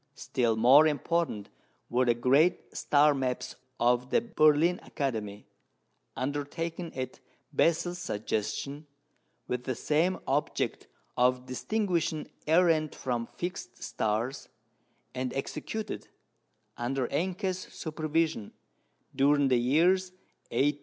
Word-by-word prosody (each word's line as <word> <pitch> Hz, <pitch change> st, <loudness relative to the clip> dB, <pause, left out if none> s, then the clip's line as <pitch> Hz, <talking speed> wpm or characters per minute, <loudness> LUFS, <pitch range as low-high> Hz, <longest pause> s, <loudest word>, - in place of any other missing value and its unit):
Still 120 Hz, -3 st, 0 dB
more 130 Hz, +8 st, +7 dB
important 150 Hz, -6 st, -1 dB, 0.4 s
were 125 Hz, +2 st, +2 dB
the 120 Hz, -1 st, +3 dB
great 140 Hz, +9 st, +2 dB
star 150 Hz, +1 st, +4 dB
maps 130 Hz, -2 st, -2 dB, 0.2 s
of 125 Hz, +1 st, +2 dB
the -, -, +4 dB
Berlin 170 Hz, -6 st, +3 dB
Academy, 110 Hz, -8 st, -4 dB, 0.7 s
undertaken 160 Hz, +5 st, -3 dB
at 130 Hz, -1 st, -5 dB, 0.3 s
Bessel's 175 Hz, +2 st, +1 dB
suggestion, 140 Hz, +2 st, -3 dB, 0.6 s
with 125 Hz, 0 st, -3 dB
the 130 Hz, -, -2 dB
same 165 Hz, +8 st, +1 dB
object 145 Hz, +2 st, -1 dB, 0.3 s
of 125 Hz, 0 st, +2 dB
distinguishing 170 Hz, -, -1 dB, 0.2 s
errant 160 Hz, -2 st, +3 dB
from 120 Hz, -2 st, -2 dB
fixed 175 Hz, -8 st, -6 dB
stars, 110 Hz, +5 st, -2 dB, 0.6 s
and 130 Hz, 0 st, -2 dB
executed, 215 Hz, +10 st, -4 dB, 0.7 s
under 125 Hz, +1 st, -1 dB
Encke's 185 Hz, +1 st, -1 dB
supervision, 155 Hz, -, -2 dB, 0.6 s
during 140 Hz, +1 st, +4 dB
the 125 Hz, -, +4 dB
years 175 Hz, +9 st, +3 dB, 0.4 s
1830 145 Hz, +2 st, +3 dB
59. -, -, -28 dB
145 Hz, 105 wpm, -29 LUFS, 125-165 Hz, 0.7 s, more